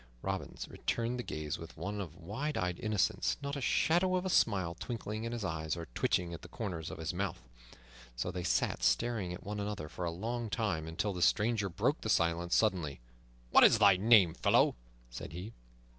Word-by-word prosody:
Robin 95 -1 -3
returned 120 +1 -2
the - - -2
gaze 75 -2 -4
with 80 0 -10
one 100 +1 -3
of 85 -5 -7
wide 110 - -3
eyed 90 -1 -1
innocence, 100 - +1
not 140 0 -3
a 140 - -4
shadow 175 +7 +2
of 180 0 -1
a 185 - 0
smile 95 - +2
twinkling 110 +3 -5
in 115 - -3
his 115 -4 -3
eyes 80 -2 -2
or 85 - -5
twitching 85 +5 0
at 85 - -7
the - - -10
corners 90 -9 -5
of - - -7
his 80 +1 -3
mouth. 90 -8 -3 0.7
So 65 +9 -2
they 90 0 -4
sat - - 0
staring 115 -7 +1
at 90 - -7
one 105 +1 -4
another 100 -6 -3
for 90 +3 -5
a - - 0
long 115 +7 -3
time, 100 -9 -1
until 95 +5 -2
the 90 - -5
stranger 105 +4 +2
broke 85 - 0
the - - -3
silence 85 +1 +2
suddenly. 90 -10 +1 0.5
"What - - +8
is - - +7
thy 100 -3 +7
name, 100 -4 +6
fellow?" - - +3 0.4
said 60 +5 -7
he. 95 +7 -7
95 Hz, 200 wpm, -33 LUFS, 85-110 Hz, 0.7 s, What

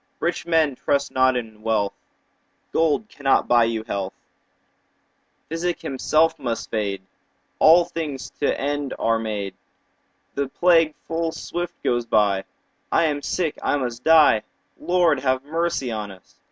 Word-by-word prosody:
Rich 175 0 -2
men, 160 -4 +3
trust 140 +2 -1
not 130 -1 +3
in 110 -3 -7
wealth, 110 -3 0 0.8
Gold 165 +6 +1
cannot 140 -8 +1
buy 120 -1 +5
you 115 -1 -2
health; 100 -4 -4 1.3
Physic 170 +2 -2
himself 155 +4 +1
must 120 -4 -4
fade; 100 -3 -2
10 95 - -36 0.5
All 170 +2 +7
things 150 -6 -5
to 145 - 0
end 145 0 -2
are 115 0 +1
made; 105 -3 -4 0.8
The 140 0 -1
plague 165 -1 +3
full 165 0 -2
swift 175 +1 -5
goes 120 -1 0
by; 100 -3 +2 0.5
I - - +3
am 145 -3 0
sick, 165 0 -2
I - - +1
must 125 -3 -4
die— 155 -9 +6 0.4
Lord, 175 -5 +2
have 130 -1 0
mercy 160 -4 -1
on 105 -2 -4
us! 95 -2 -16
140 Hz, 140 wpm, -23 LUFS, 115-165 Hz, 1.3 s, All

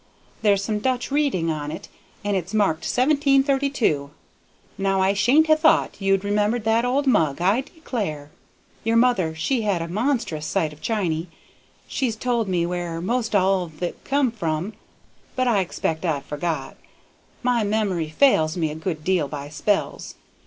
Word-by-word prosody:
There's 200 -2 +3
some 210 0 -1
Dutch 255 +3 -1
reading 270 - +1
on 150 -1 -4
it 170 +6 -7 0.4
and 205 -1 0
it's 190 +3 -3
marked 175 -6 +1
1732. 275 - +2 0.7
Now 195 0 0
I 190 +1 +3
shouldn't 245 +11 +4
ha' 315 - +5
thought 315 -8 +3
you'd 195 0 +2
remembered 210 +3 +1
that 225 +2 +2
old 270 +3 +1
mug, 160 - +2
I 195 +8 +2
declare. 210 - -5 0.5
Your 225 +1 +2
aunt 185 -10 0
she 240 +10 0
had 205 -5 0
a 165 - -4
monstrous 205 - -1
sight 160 -6 0
of 150 - -17
chiny. 180 -7 -1 0.6
She's 250 -6 -1
told 235 -1 -1
me 175 -2 +1
where 175 -1 -3
'most 225 +4 -1
all 190 -1 +3
of 160 +1 -11
it 175 - -4
come 275 -3 +1
from, 175 -2 -3 0.6
but 255 -1 +1
I 225 -4 +3
expect 165 -3 -2
I've 150 -5 -1
forgot. 150 -1 -3 0.7
My 245 -2 +2
memory 200 -6 0
fails 155 - +3
me 160 -3 0
a - - -6
good 160 -1 -4
deal 180 -4 +1
by 145 0 -6
spells. 195 +7 -2
195 Hz, 160 wpm, -23 LUFS, 165-240 Hz, 0.7 s, ha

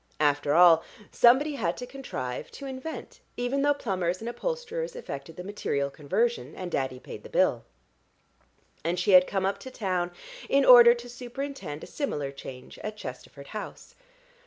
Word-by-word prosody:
After 145 -1 +2
all 170 -2 +8 0.3
somebody 265 +6 +5
had 185 -11 -1
to 250 - -5
contrive, 245 - -5
to 280 - -8
invent, 265 +4 -7 0.2
even 245 +3 0
though 290 0 +3
plumbers 185 -8 -1
and 225 - -6
upholsterers 485 - -3
effected 160 - -7
the 180 - -7
material 140 -8 -2
conversion, 165 - -1
and 180 -2 -6
Daddy 130 -3 -2
paid - - -9
the - - -12
bill; - - +2 1.2
and 170 +2 -1
she 180 - +2
had 185 -1 +8
come 195 -1 -1
up 195 - -1
to 260 - -8
town 185 -8 -1 0.4
in 275 0 +4
order 240 -1 +10
to 240 0 -9
superintend 245 - -6
a - - -5
similar 145 - -3
change 130 -2 -10
at 215 0 -6
Chesterford 140 -1 -9
House. 215 - -8
200 Hz, 160 wpm, -27 LUFS, -, 1.2 s, order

